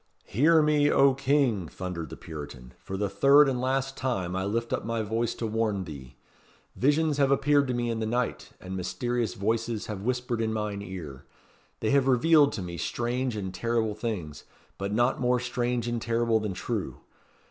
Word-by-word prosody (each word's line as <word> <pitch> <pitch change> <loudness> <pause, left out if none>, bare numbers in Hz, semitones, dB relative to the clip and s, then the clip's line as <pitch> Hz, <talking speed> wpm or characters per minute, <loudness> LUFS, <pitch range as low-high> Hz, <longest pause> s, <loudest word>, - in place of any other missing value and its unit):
"Hear 155 +7 +4
me, 150 -1 +3
O 140 -2 +5
King!" 135 - +1
thundered 85 -3 -6
the - - -9
Puritan. 70 -6 -9
"For 95 - -6
the 105 +1 0
third 140 +7 +5
and 125 -2 -1
last 135 +1 -1
time 95 -9 -2
I 95 0 -1
lift 115 +3 -2
up - - -1
my 115 -1 -2
voice 115 +2 -1
to 115 - -4
warn 110 -3 0
thee. 70 -7 -10 0.6
Visions 150 +2 +2
have 140 -1 +4
appeared 140 +1 +3
to 125 - -1
me 120 -1 -1
in 115 - -2
the 110 - -2
night, 120 +2 -2
and 95 +1 -7
mysterious 105 +6 -2
voices 115 +2 -1
have 105 -3 -5
whispered 125 0 -1
in 110 -1 0
mine 105 -2 -3
ear. 85 -9 -8 0.6
They 110 - +1
have 140 -1 +3
revealed 145 +3 +5
to 100 - -4
me 85 -1 -6
strange 120 - -2
and 95 -3 -4
terrible 115 -2 0
things 105 -9 -5 0.4
but 100 +1 -3
not 120 +5 +1
more 125 0 +2
strange 120 -1 -1
and 120 -1 -2
terrible 115 0 +1
than 105 -3 -3
true. 95 - -4
115 Hz, 185 wpm, -27 LUFS, 100-130 Hz, 0.6 s, O